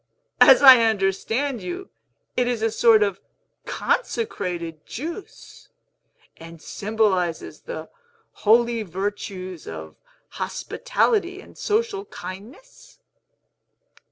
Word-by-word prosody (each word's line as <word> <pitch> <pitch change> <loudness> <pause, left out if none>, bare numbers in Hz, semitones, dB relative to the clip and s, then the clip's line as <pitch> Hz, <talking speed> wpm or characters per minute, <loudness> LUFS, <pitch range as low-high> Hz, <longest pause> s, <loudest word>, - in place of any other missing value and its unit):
As 270 0 +8
I 260 -3 +10
understand 225 +5 0
you, 365 +2 -6 0.5
it 250 -1 +1
is 240 -3 -1
a 225 - +1
sort 225 -1 +5
of 200 -2 -2 0.5
consecrated 180 - -2
juice, 335 - -9 0.7
and 165 0 -12
symbolizes 195 -4 -1
the - - -7 0.5
holy 235 +2 +3
virtues 190 -2 -5
of 80 -1 -8 0.3
hospitality 410 -6 -1
and - - -15
social 425 -2 -1
kindness?" 200 - -11
225 Hz, 90 wpm, -23 LUFS, 185-300 Hz, 0.7 s, I